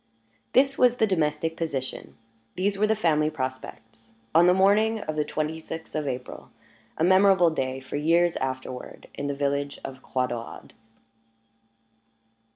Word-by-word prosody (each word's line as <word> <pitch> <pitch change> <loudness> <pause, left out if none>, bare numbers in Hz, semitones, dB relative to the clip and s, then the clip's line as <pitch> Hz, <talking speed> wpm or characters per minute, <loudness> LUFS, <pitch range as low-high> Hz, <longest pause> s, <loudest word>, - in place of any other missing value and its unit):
This 270 +1 +3
was 245 -1 +4
the 220 - +3
domestic 160 -4 0
position, 140 -6 -5 0.4
these 200 +2 0
were 210 +2 +2
the 220 - +2
family 155 -6 +2
prospects, 115 -5 -7 0.2
on 170 +2 +6
the 180 - +6
morning 210 +4 +3
of 155 -4 -4
the 150 - +1
twenty 155 +1 -3
sixth 160 0 -8
of 155 -2 -2
April 125 -1 -6 0.5
a - - 0
memorable 185 -1 +5
day, 130 -3 -2
for 130 +2 -6
years 170 +3 +2
afterward, 130 -1 -5
in 140 - -4
the 140 - -2
village 140 0 -2
of 130 -1 -8
Croix 130 -1 -1
Daurade. 120 -2 -7
155 Hz, 150 wpm, -26 LUFS, 130-185 Hz, 0.5 s, on